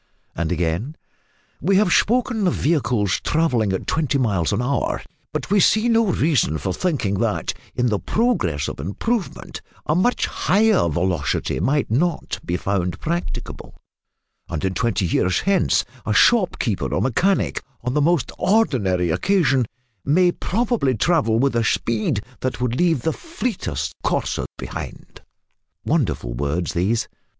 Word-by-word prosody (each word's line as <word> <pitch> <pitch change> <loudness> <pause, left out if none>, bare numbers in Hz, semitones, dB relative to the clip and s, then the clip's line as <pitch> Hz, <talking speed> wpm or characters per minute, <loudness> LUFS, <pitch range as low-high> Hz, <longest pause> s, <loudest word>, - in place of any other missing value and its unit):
And 85 +1 -2
again, 90 - -1 0.7
"We 195 +3 +2
have 190 -3 +4
spoken 235 -3 +2
of 180 - +1
vehicles 125 - +1
travelling 125 -10 +1
at 95 - -2
twenty 150 -3 0
miles 100 -10 +1
an 100 - 0
hour; 130 +3 -1 0.3
but - - -4
we 205 - +5
see 215 +4 +4
no 230 -1 +3
reason 145 - +1
for 90 +6 -3
thinking 120 - -1
that, - - -1 0.2
in 125 0 +1
the 105 -3 0
progress 95 - 0
of - - -6
improvement, 185 - -3 0.2
a 150 - +1
much 185 +9 +2
higher 210 - +2
velocity 85 -1 -1
might 140 -3 0
not 165 +7 0
be 85 - -1
found 90 -3 -2
practicable; 85 -2 -4 0.7
and - - -3
in 95 - 0
twenty 115 -2 0
years 90 +2 +1
hence 195 -3 +2 0.2
a 105 - -1
shopkeeper 135 - +2
or - - 0
mechanic, 180 - +1 0.2
on 125 +1 -1
the 150 - +2
most 155 -4 +2
ordinary 115 - +2
occasion, 140 - +2 0.4
may 175 +5 +3
probably 210 - 0
travel 125 - +2
with 135 +1 +1
a 115 - +2
speed 110 -2 0 0.2
that 130 -2 -3
would 125 -1 -1
leave 165 -3 +2
the 160 - +1
fleetest 180 - -4
courser - - -1
behind." - - -8 0.6
Wonderful - - 0
words 75 +7 -2
these! 100 +7 0
125 Hz, 140 wpm, -21 LUFS, -, 0.7 s, we